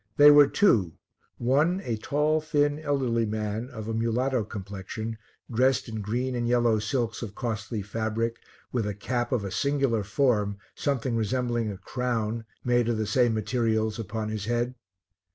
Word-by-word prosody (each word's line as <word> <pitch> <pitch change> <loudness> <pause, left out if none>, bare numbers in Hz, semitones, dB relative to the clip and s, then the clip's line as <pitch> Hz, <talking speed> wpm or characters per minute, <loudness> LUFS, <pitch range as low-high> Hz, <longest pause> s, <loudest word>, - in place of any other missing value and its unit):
They 145 0 +9
were 145 -1 +8
two, 110 - +3 0.4
one 145 +9 +2
a 115 - -1
tall 150 +7 +1
thin 145 -1 +1
elderly 130 -7 0
man 110 +2 -3
of 110 -5 -7
a 115 - -2
mulatto 115 +2 +1
complexion, 105 +2 -6 0.3
dressed 130 +3 +2
in 110 -2 -4
green 120 +6 -1
and 120 -1 -1
yellow 120 -2 +3
silks 110 +2 -1
of 105 -4 -6
costly 110 -2 -3
fabric, 115 +2 -2 0.3
with 115 -4 0
a 105 - -3
cap 120 +5 -2
of 125 -5 +1
a 100 - -4
singular 135 -5 +1
form, 105 -2 +1 0.2
something 130 -4 -1
resembling 120 0 0
a 100 - -7
crown, 115 -1 -2 0.2
made 120 -1 +2
of 115 - +1
the 110 - 0
same 120 +2 +2
materials, 110 0 0
upon 110 0 -3
his 110 -2 -3
head. 120 +2 0
115 Hz, 160 wpm, -27 LUFS, 110-125 Hz, 0.4 s, They